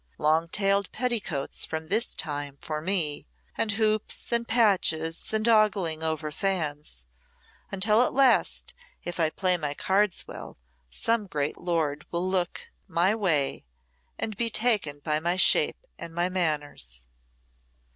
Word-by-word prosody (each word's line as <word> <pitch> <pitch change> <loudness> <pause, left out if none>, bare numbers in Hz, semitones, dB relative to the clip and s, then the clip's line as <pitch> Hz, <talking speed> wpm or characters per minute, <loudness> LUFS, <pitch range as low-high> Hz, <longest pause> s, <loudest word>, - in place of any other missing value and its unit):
Long 160 +2 +2
tailed 200 +1 +1
petticoats 220 - -2
from 160 0 -4
this 225 +4 0
time 145 -4 -2
for 155 -1 -4
me, 160 - 0 0.3
and 215 - 0
hoops 215 0 -1
and 235 0 +1
patches, 185 -8 +1
and 220 +1 0
ogling 205 -8 +3
over 160 -1 -2
fans 150 - -3 0.6
until 210 +4 +3
at 250 - +2
last, 270 -1 +3 0.3
if 175 0 -5
I 160 -2 +3
play 180 +2 +1
my 150 -3 -3
cards 195 +2 +1
well, - - -9 0.3
some 225 - 0
great 145 -4 -2
lord 155 -4 -1
will 175 +2 -2
look 185 -2 -2 0.2
my 180 +2 +2
way 160 - 0 0.5
and 215 - -3
be 230 +2 +1
taken 210 -11 +1
by 150 -1 +1
my 170 +3 0
shape 195 - +4
and 165 -1 -8
my 175 +1 +1
manners." 145 - -2
175 Hz, 135 wpm, -27 LUFS, 155-210 Hz, 0.6 s, shape